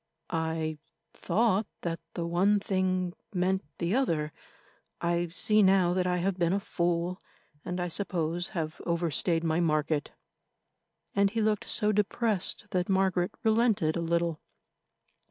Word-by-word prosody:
"I 160 -1 -2 0.3
thought 210 +2 +1
that 165 -1 -2 0.2
the 170 - -2
one 190 +5 +3
thing 185 -2 0 0.2
meant 185 +1 +1
the 170 +3 -1
other; 165 - 0 0.7
I 170 0 0
see 215 +5 +2
now 190 -2 +4
that 180 0 +1
I 180 0 +1
have 185 +1 -1
been 170 +1 +2
a 200 - +2
fool, 175 -1 -1 0.4
and, 180 +1 -3
I 180 - -1
suppose, 175 -2 -1
have 155 -1 -3
overstayed 170 0 +1
my 160 0 +1
market," 155 -2 +1 1.1
and 200 0 +4
he 225 - -2
looked 215 -1 0
so 210 -2 +2
depressed 210 -1 +1
that 180 -1 0
Margaret 190 -2 +1
relented 220 -8 +3
a 170 - -1
little. 170 -1 0
180 Hz, 135 wpm, -29 LUFS, 170-195 Hz, 1.1 s, now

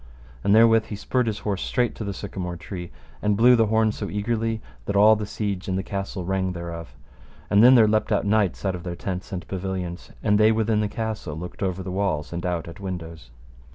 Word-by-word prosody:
And 100 - +4
therewith 115 0 +6
he 105 - -5
spurred 125 +4 0
his 105 -2 -1
horse 100 -3 -1
straight 125 -2 0
to - - -6
the 100 - -3
sycamore 95 -2 -5
tree, 90 0 -7 0.3
and 105 -1 +1
blew 120 +3 +6
so - - +8
the 115 - +4
horn 110 0 +3 0.2
eagerly 110 +2 -1 0.3
that 100 - -1
all 105 +2 +7
the 105 -1 -4
siege 100 -3 -3
and 95 -1 -1
the 95 - -2
castle 95 -1 -4
rang 95 0 -1
thereof. 85 -2 -7 0.6
And 105 +2 +6
then 125 +2 +9
there 115 -3 +7
leapt 110 +1 +1
out 105 - +2
knights 105 -3 +1
out 95 - +1
of 90 - -6
their 85 0 -5
tents 95 +3 -5
and 90 -2 -5
pavilions, 95 -2 -4
and 105 -1 +3
they 110 +1 +6
within 110 -1 +1
the 105 - +1
castle 110 -8 -4
looked 90 +3 -8
over 95 -1 -1
the 90 - -5
walls 90 -6 -1
and 85 +1 -4
out 85 -2 -2
at 85 - -10
windows. 85 -8 -7
100 Hz, 225 wpm, -24 LUFS, 90-110 Hz, 0.6 s, then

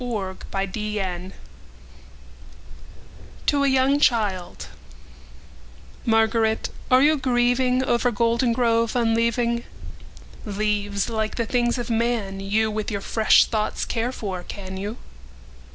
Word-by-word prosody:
Spring 205 -6 -3 0.6
and 185 -1 -4
Fall - - -17 2.1
to 285 -1 +2
a - - +3
young 265 +1 +3
childMÁRGARÉT, 205 -9 0 2.2
áre 255 +1 +5
you 305 -1 +3
gríevingOver 250 0 +2
Goldengrove 230 0 +1
unleaving? 235 0 +1 0.8
Leáves, 205 -1 -1
líke 220 -2 -2
the 235 - -1
things 240 +1 0
of 240 -1 -4
man, 225 -4 -1
youWith 215 +2 -1
your 200 - -2
fresh 220 +2 +4
thoughts 215 -2 -2
care 235 +1 -2
for, 195 -7 -5
can 190 +1 -8
you? 205 +4 -5
230 Hz, 100 wpm, -23 LUFS, 205-245 Hz, 2.2 s, áre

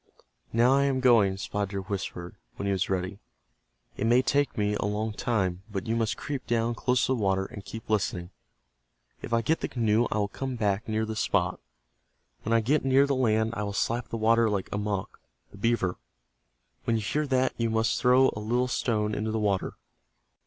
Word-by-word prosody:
"Now 120 +3 +4
I 140 0 +3
am 135 -2 +1
going," 115 -7 +4
Spotted 100 0 -3
Deer 100 -1 -3
whispered, 90 -2 -5 0.2
when - - -5
he 100 - +1
was 95 -2 0
ready. 95 +1 -2 0.8
"It 110 - 0
may 120 +2 +4
take 140 +1 +1
me 105 -1 +1
a 105 - -1
long 105 +1 -2
time, 95 -7 -1
but 100 -3 -4
you 115 - 0
must 115 -2 0
creep 140 -3 -5
down 115 0 +1
close 125 +1 +1
to 130 - +1
the 120 - -2
water 95 -1 +1
and 100 +1 -9
keep 115 +1 -9
listening. 100 -4 -1 0.9
If - - -7
I 115 0 +2
get 160 +8 +1
the - - -2
canoe 115 -1 +1
I - - 0
will 105 -1 +1
come 130 +5 -5
back 105 -1 -1
near 110 0 0
this 110 -1 -4
spot. - - 0 0.8
When 110 - -4
I 115 0 +4
get 140 +7 +1
near 135 +1 +4
the 140 - 0
land 110 -3 +1
I 105 - -3
will 100 -1 -3
slap 115 +4 -1
the 115 - -4
water 115 +1 +3
like 100 -2 -2
Amoch, 105 -2 -3 0.3
the - - -13
beaver. 105 -5 0 0.9
When 115 - +2
you 110 - -1
hear 150 +9 -1
that 130 -1 +1
you 115 -1 0
must 110 +1 +1
throw 130 +1 +5
a - - -4
little 120 +4 0
stone 110 -4 0
into 110 +1 -2
the 110 - -1
water. 100 -3 0
110 Hz, 205 wpm, -27 LUFS, 100-120 Hz, 0.9 s, throw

